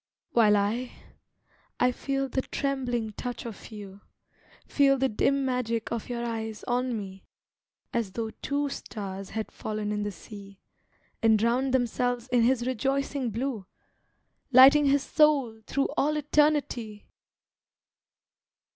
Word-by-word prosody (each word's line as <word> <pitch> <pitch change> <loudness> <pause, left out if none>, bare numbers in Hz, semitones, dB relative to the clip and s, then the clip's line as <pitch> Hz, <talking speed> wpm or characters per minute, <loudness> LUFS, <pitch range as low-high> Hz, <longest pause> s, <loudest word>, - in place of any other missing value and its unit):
While 215 -6 +5
I, 225 +5 -1 0.9
I 250 - +4
feel 275 +2 -2
the 265 0 -1
trembling 250 -6 -2
touch 245 +4 -6
of 225 -4 -8
you, 205 -2 -10 0.6
Feel 275 -1 +3
the 265 +1 +2
dim 275 +4 +1
magic 235 -3 -1
of 235 0 -4
your 240 -1 -3
eyes 225 -2 -4
on 245 -1 -1
me, 195 -2 -9 0.7
As 225 -5 -1
though 225 0 -3
two 285 +1 -1
stars 195 -7 -6
had 220 0 -4
fallen 215 -1 -4
in 210 0 -1
the 205 - -2
sea, 200 +1 -12 0.6
And 225 -1 +5
drowned 240 +5 +1
themselves 245 -1 0
in 245 -1 +3
his 240 0 +2
rejoicing 270 +1 -1
blue, 225 -3 -3 0.8
Lighting 270 +4 +8
his 280 0 +3
soul 275 -8 +2
through 275 0 0
all 300 +2 +1
eternity! 295 -8 0
240 Hz, 130 wpm, -27 LUFS, 215-270 Hz, 0.9 s, Lighting